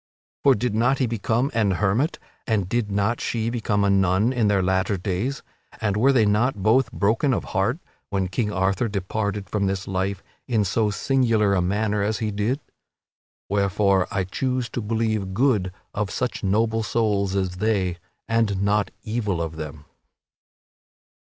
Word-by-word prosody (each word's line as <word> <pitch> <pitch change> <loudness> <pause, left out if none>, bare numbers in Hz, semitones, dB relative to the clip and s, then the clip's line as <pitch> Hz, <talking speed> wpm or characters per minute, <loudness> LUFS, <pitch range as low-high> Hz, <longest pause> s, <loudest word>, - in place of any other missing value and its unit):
For 135 -2 +6
did 115 +1 -1
not 120 +5 +2
he 130 - +1
become 115 +3 0
an 105 -4 +2
hermit, 110 - +1 0.3
and 105 -5 +1
did 115 +1 -1
not 100 +4 0
she 115 0 -1
become 105 -4 0
a 100 - +3
nun 95 +5 +3
in 120 -4 +2
their 100 -2 +2
latter 95 +2 +1
days, 95 +9 -2 0.4
and 105 -2 0
were 125 +6 +4
they 120 -5 +4
not 105 0 +1
both 115 +3 +3
broken 115 +5 +1
of - - -2
heart 110 +8 0 0.3
when 95 -2 0
King 105 +3 -1
Arthur 95 +3 +1
departed 100 0 -2
from 100 0 0
this 95 -1 -2
life 95 0 -2 0.2
in 110 -5 +1
so 105 +3 +1
singular 115 -3 +2
a 95 - +2
manner 105 +3 0
as 105 +1 0
he 110 0 -2
did? 105 +7 -1 0.9
Wherefore 100 -1 +2
I 95 - -1
choose 125 +5 -2
to 120 - -4
believe 110 -3 -1
good 105 -7 +2 0.2
of 105 -1 -2
such - - -3
noble 110 +3 +1
souls 105 -4 0
as 95 -2 -1
they, 95 -4 0 0.3
and 115 -4 +1
not 100 0 +2
evil 105 -5 -1
of 80 -1 -3
them. 75 -1 -7
105 Hz, 165 wpm, -24 LUFS, 95-115 Hz, 0.9 s, For